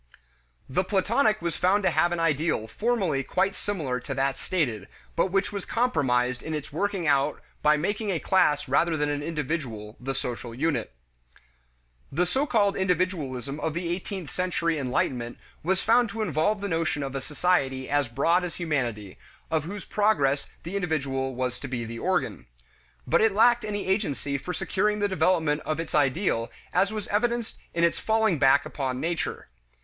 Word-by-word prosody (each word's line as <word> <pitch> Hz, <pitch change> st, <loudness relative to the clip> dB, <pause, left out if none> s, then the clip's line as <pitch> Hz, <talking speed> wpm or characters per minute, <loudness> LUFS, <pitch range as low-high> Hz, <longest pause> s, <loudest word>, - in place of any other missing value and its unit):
The 180 Hz, +8 st, +1 dB
Platonic 215 Hz, +2 st, +2 dB
was 170 Hz, -2 st, -1 dB
found 195 Hz, +3 st, +2 dB
to 185 Hz, -, +3 dB
have 175 Hz, +2 st, +3 dB
an 175 Hz, -, -1 dB
ideal 155 Hz, -6 st, +1 dB
formally 195 Hz, -, 0 dB
quite 190 Hz, +8 st, 0 dB
similar 150 Hz, -12 st, -2 dB
to 135 Hz, +2 st, -5 dB
that 135 Hz, 0 st, 0 dB
stated, 120 Hz, -, -1 dB, 0.3 s
but 170 Hz, -, +3 dB
which 195 Hz, +1 st, 0 dB
was 200 Hz, -2 st, -4 dB
compromised 130 Hz, -, +1 dB
in 160 Hz, -, -4 dB
its 150 Hz, -2 st, -6 dB
working 195 Hz, +1 st, -1 dB
out 140 Hz, 0 st, +2 dB, 0.2 s
by 150 Hz, 0 st, +5 dB
making 205 Hz, +7 st, -1 dB
a 185 Hz, -, +1 dB
class 150 Hz, -6 st, +2 dB
rather 160 Hz, +5 st, +2 dB
than 150 Hz, 0 st, 0 dB
an 145 Hz, 0 st, -1 dB
individual 140 Hz, -9 st, -4 dB
the 135 Hz, +2 st, -3 dB
social 120 Hz, -2 st, -4 dB
unit. 155 Hz, -, 0 dB, 1.2 s
The 175 Hz, +6 st, +2 dB
so 265 Hz, +11 st, 0 dB
called 205 Hz, -5 st, +3 dB
individualism 160 Hz, -, -1 dB
of 155 Hz, +1 st, -2 dB
the 170 Hz, 0 st, -2 dB
eighteenth 180 Hz, -2 st, -4 dB
century 170 Hz, -3 st, 0 dB
enlightenment 125 Hz, -2 st, -1 dB, 0.2 s
was 190 Hz, +3 st, +1 dB
found 235 Hz, +1 st, +4 dB
to 220 Hz, +2 st, -2 dB
involve 195 Hz, +4 st, +1 dB
the 200 Hz, -, -2 dB
notion 165 Hz, -4 st, 0 dB
of 135 Hz, -1 st, -4 dB
a 135 Hz, -, -3 dB
society 135 Hz, -4 st, 0 dB
as 145 Hz, -2 st, +1 dB
broad 165 Hz, +10 st, +2 dB
as 175 Hz, -2 st, -4 dB
humanity, 120 Hz, -, -2 dB, 0.3 s
of 155 Hz, -2 st, +1 dB
whose 200 Hz, +3 st, -6 dB
progress 145 Hz, -10 st, +2 dB
the 170 Hz, -, -6 dB
individual 135 Hz, -8 st, -1 dB
was 125 Hz, 0 st, -2 dB
to 140 Hz, -, -6 dB
be 120 Hz, -3 st, -3 dB
the 115 Hz, +1 st, -6 dB
organ. 185 Hz, +4 st, -1 dB, 0.6 s
But -, -, +3 dB
it 220 Hz, -2 st, +4 dB
lacked 240 Hz, +2 st, +5 dB
any 205 Hz, -1 st, -3 dB
agency 145 Hz, -8 st, -1 dB
for 140 Hz, +7 st, -5 dB
securing 210 Hz, +3 st, 0 dB
the 205 Hz, -1 st, +1 dB
development 165 Hz, -6 st, +2 dB
of 155 Hz, 0 st, -2 dB
its 165 Hz, -, -5 dB
ideal 140 Hz, -, +1 dB, 0.2 s
as 195 Hz, +2 st, +3 dB
was 215 Hz, -2 st, -4 dB
evidenced 235 Hz, +2 st, 0 dB, 0.2 s
in 170 Hz, -, +1 dB
its 170 Hz, -, +3 dB
falling 220 Hz, -7 st, +2 dB
back 135 Hz, 0 st, +5 dB
upon 130 Hz, -3 st, -3 dB
Nature. 170 Hz, +2 st, -2 dB
165 Hz, 175 wpm, -27 LUFS, 135-195 Hz, 1.2 s, by